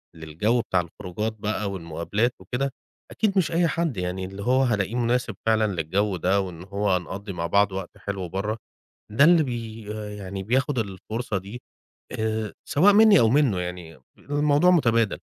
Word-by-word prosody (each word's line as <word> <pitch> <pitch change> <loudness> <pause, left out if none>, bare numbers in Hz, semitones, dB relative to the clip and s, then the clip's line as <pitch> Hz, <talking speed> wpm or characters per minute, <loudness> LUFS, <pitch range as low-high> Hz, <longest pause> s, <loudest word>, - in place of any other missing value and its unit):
للجو 80 +10 0
بتاع 95 -5 0
الخروجات 90 +6 -5
بَقى 105 -1 -2
والمقابلات 85 +6 -1
وكده، 135 +2 -2 0.4
أكيد 205 -3 0
مش 180 -4 +2
أي 170 0 +3
حد 165 - -1
يعني، 90 +1 -3
اللي 95 +2 -7
هو 130 +3 +3
هالاقيه 110 -3 0
مناسب 120 -2 0
فعلًا 110 -1 +3
للجو 95 +4 0
ده، 95 +4 +2
وإن 90 -3 -7
هو 100 +2 -2
هنقضّي 95 +3 -5
مع 85 -1 -3
بعض 100 +3 +3
وقت 95 -2 -6
حلو 95 -3 -4
برّه، 105 +4 -2 0.5
ده 115 +7 +4
اللي 165 0 +6
بي 115 -4 -5 0.4
يعني، 95 0 -6
بياخد 130 +5 0
الفرصة 110 +2 -3
دي 100 +6 -9 0.6
آآ، 110 -1 -2
سواء 195 +8 +5
منّي 215 -1 +7
أو 115 - +4
منُّه، 130 -8 +3
يعني، 90 -4 -6 0.2
الموضوع 145 +4 +2
مُتَبادل. 115 - +2
105 Hz, 160 wpm, -25 LUFS, 95-125 Hz, 0.6 s, منّي